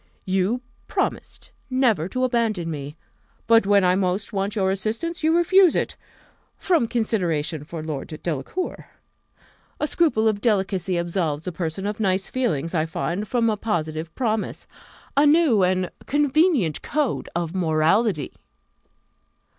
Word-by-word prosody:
You 195 +6 0 0.3
promised - - -3 0.2
never 245 - +2
to 255 +5 -2
abandon 225 -9 0
me; 145 -1 -6 0.5
but 230 -3 +4
when 200 -1 +5
I 180 - +4
most 190 +3 -1
want 200 +1 -1
your 190 -2 +1
assistance, 225 - -3
you 320 +1 +3
refuse 360 0 +5
it, - - -1 0.6
from 335 -10 +2
consideration 175 - -1
for 160 +1 -7
Lord 150 -3 -4 0.2
Delacour. 170 - -4 0.9
A - - +1
scruple 300 -9 +2
of 210 -2 0
delicacy 190 -4 0
absolves 170 -3 -2
a 180 - -2
person 170 +2 -4
of 210 +1 -3
nice 190 -2 0
feelings, 165 - -1
I 160 -2 +1
find, 175 +5 -3
from 235 0 +1
a 220 - +2
positive 165 -6 -3
promise 220 -4 -2 0.5
a 285 +2 +5
new 295 - +4
and 185 0 +1 0.2
convenient 290 - +2
code 295 -4 -1
of 170 -1 -2
morality!" 165 - +1
200 Hz, 135 wpm, -23 LUFS, 170-240 Hz, 0.9 s, when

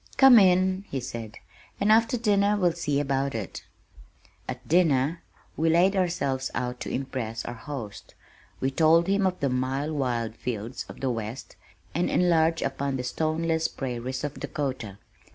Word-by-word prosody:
"Come 265 -4 +9
in," 185 0 +3
he 135 - -2
said, 115 -3 -7 0.4
"and 205 +2 +3
after 230 +2 +4
dinner 205 -2 +2
we'll 180 -3 +3
see 150 -4 -1
about 135 -2 -1
it." 110 -4 -5 0.9
At - - -6
dinner 160 -2 +2 0.3
we 165 +1 +1
laid 180 +4 +4
ourselves 140 -8 0
out 125 0 -3
to - - -5
impress 125 -4 -4
our 120 - -4
host. 120 -4 -8 0.4
We 135 - 0
told 165 +4 +4
him 195 +1 +2
of 185 -1 -3
the 140 - +1
mile 130 +4 -1
wide 120 -6 -1
fields 115 +1 -5
of - - -11
the 135 -2 0
west, 115 +2 -6 0.4
and 175 +3 0
enlarged 165 -2 +2
upon 135 0 -2
the 125 - -3
stoneless 160 +4 0
prairies 130 0 -4
of 145 -1 -4
Dakota. 130 - -4
140 Hz, 155 wpm, -26 LUFS, 125-175 Hz, 0.9 s, Come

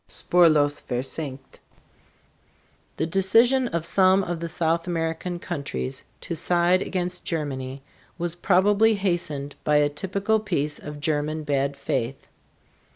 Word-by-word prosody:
SPURLOS 155 -5 +3
VERSENKT. 135 +2 -5 1.4
The - - 0
decision 225 +9 +3
of 170 -6 -3
some 190 +2 +4
of 175 -2 -3
the 170 0 -4
South 165 +1 0
American 165 +1 -2
countries 140 -6 -4 0.2
to - - -5
side 175 +3 +2
against 180 -1 -3
Germany 135 -4 -4 0.3
was 175 -1 -2
probably 205 +5 +3
hastened 175 -7 -2
by 150 - +2
a 145 0 +4
typical 200 +7 0
piece 150 -8 -2
of 150 0 -8
German 155 +1 -1
bad 140 -1 -1
faith. 135 -1 -3
165 Hz, 120 wpm, -24 LUFS, 145-185 Hz, 1.4 s, some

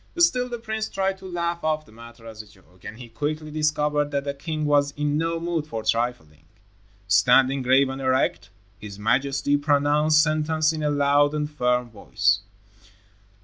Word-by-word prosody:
Still 255 -8 +2
the 240 - -4
prince 220 -1 -4
tried 190 0 -2
to 190 - -10
laugh 170 -1 -3
off 155 -1 -1
the - - -20
matter 115 +1 -14
as 110 -1 -9
a 110 - -18
joke, 95 -3 -23
but - - -8
he 120 +1 -11
quickly 150 +6 -4
discovered 150 -1 0
that 140 -1 -2
the 140 0 -3
king 155 +2 -4
was 145 -1 +2
in 145 0 -1
no 165 +2 -1
mood 165 -2 -3
for 115 -6 -5
trifling. 110 -10 -2 0.6
Standing 125 +7 +4
grave 130 +2 +3
and 135 +1 -6
erect, 130 0 0 0.3
his 100 -2 -9
majesty 135 +6 +1
pronounced 150 +1 +3
sentence 155 0 0
in 155 - -5
a 150 - 0
loud 145 +1 +2
and 150 0 -3
firm 125 -4 -1
voice. 100 -2 0
145 Hz, 175 wpm, -24 LUFS, 125-155 Hz, 0.6 s, Standing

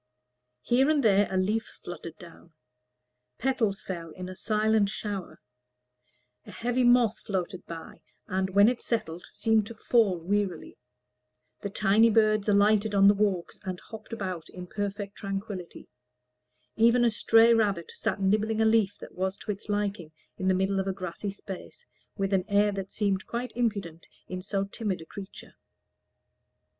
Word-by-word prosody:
Here 260 +4 +3
and 300 -3 +3
there 205 -2 +4
a 190 - -1
leaf 210 +4 -1
fluttered 170 -2 -8
down; 170 -3 -15 0.8
petals 225 -6 0
fell 170 -3 -5
in 185 +2 -7
a 185 - -8
silent 215 0 +2
shower; 205 -3 -5 1.0
a - - -14
heavy 245 +2 0
moth 240 -3 +4
fluttered 185 -1 -3
by, 165 -1 -9 0.2
and, 190 -2 -1
when 200 +2 +6
it 245 0 +1
settled, 175 -7 -3
seemed 220 -2 +1
to 230 - -9
fall 215 -4 +2
wearily; 185 0 -2 0.8
the 200 - -3
tiny 210 +3 +4
birds 215 -1 +3
alighted 205 +1 +3
on 200 0 +6
the 200 - +7
walks, 200 -4 -1
and 185 -1 -4
hopped 220 +1 -11
about 185 -7 -4
in 180 0 -8
perfect 205 +1 -4
tranquillity; 195 -3 -6 0.9
even 235 +2 +4
a 235 - +4
stray 225 +2 +5
rabbit 205 -7 +1
sat - - -2
nibbling 215 +3 +1
a 220 - +4
leaf 220 -3 +3
that - - -11
was 190 +1 -2
to 210 - -4
its 200 +1 -8
liking, 205 -5 -2 0.2
in 190 - -3
the 190 - +4
middle 195 +1 +1
of 190 - -2
a 195 - 0
grassy 185 +2 -5
space, 195 -1 -9 0.3
with 195 -1 -1
an 190 -1 +3
air 205 +1 +3
that 195 -1 -5
seemed 200 -3 -1
quite 245 +2 -4
impudent 200 -9 -2 0.2
in 185 0 -5
so 195 +1 -1
timid 200 -1 -3
a 160 - -10
creature. 195 +3 -10
200 Hz, 160 wpm, -28 LUFS, 190-220 Hz, 1.0 s, the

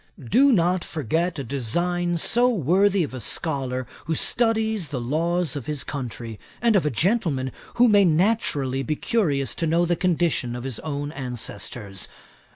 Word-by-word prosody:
Do 275 - +5
not 180 -4 +2
forget 165 +4 -1
a 140 - -3
design 175 +8 -1
so 240 +9 +3
worthy 195 - +2
of 145 - -5
a 130 - -5
scholar 130 -1 -1 0.2
who 160 +1 -1
studies 220 -3 +1
the 135 - -3
laws 165 +7 0
of 140 -5 -6
his 150 -2 -1
country, 120 -5 -6 0.2
and 230 -2 +3
of 175 -6 +3
a - - +3
gentleman 155 - 0 0.2
who 245 +1 +5
may 205 -3 +5
naturally 155 - +1
be 145 +4 -1
curious 145 - 0
to 165 - -2
know 170 +2 +2
the 175 0 +1
condition 170 -9 0
of 120 - -6
his 130 -3 -4
own 145 -1 -4
ancestors. 115 -6 -5
160 Hz, 160 wpm, -24 LUFS, 130-185 Hz, 0.2 s, Do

